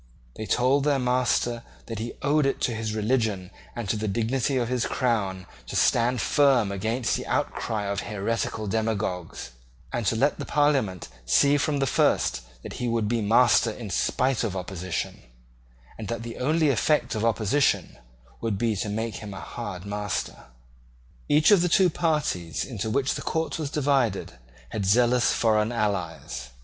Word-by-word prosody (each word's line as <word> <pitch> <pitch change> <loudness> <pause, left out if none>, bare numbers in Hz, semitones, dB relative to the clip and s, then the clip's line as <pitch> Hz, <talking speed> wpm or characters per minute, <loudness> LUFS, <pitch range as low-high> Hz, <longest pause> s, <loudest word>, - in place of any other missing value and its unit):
They 110 - -6
told 130 +3 +2
their 145 -1 +2
master 125 -2 +1 0.2
that 115 -2 -6
he 115 +2 -4
owed 145 +1 +3
it 135 - -1
to 120 - +1
his 110 -1 -3
religion 110 -4 0 0.2
and 120 -3 -4
to 110 - 0
the 110 0 -2
dignity 120 +6 0
of 120 -2 0
his 125 -1 0
crown 100 -7 -1 0.2
to - - -6
stand 120 0 +2
firm 135 -8 +3
against 110 +5 -1
the - - -5
outcry 110 -2 -1
of 100 0 -2
heretical 110 +1 -2
demagogues, 100 - -2 0.4
and 120 - -1
to - - +2
let 140 +6 +1
the - - -4
Parliament 135 - +1 0.2
see 140 - +4
from 145 0 0
the 135 - +1
first 65 - +2 0.2
that - - -7
he 125 - 0
would 115 -2 0
be 115 +1 0
master 115 +2 +4
in 110 -2 -7
spite 130 +7 +1
of 105 -5 -2
opposition, 90 -1 -4 0.8
and 110 - -5
that 115 0 -4
the 115 -1 -7
only 155 +3 +2
effect 140 +5 +1
of 110 - -2
opposition 115 +5 +1 0.4
would 115 -4 -1
be 115 0 0
to 105 - -2
make 110 +2 -3
him 105 -3 -8
a - - -7
hard 100 -6 -7
master. 105 0 -4 0.8
Each 150 +6 +5
of 200 -4 +6
the 175 - +1
two 180 0 +4
parties 150 - -1
into 110 -4 -4
which 135 +4 +1
the - - -5
court 160 0 -2
was 150 -3 -2
divided 135 -8 0 0.4
had 105 - -3
zealous 120 +5 +3
foreign 110 -1 +2
allies. 90 - -3
115 Hz, 170 wpm, -26 LUFS, 105-130 Hz, 0.8 s, of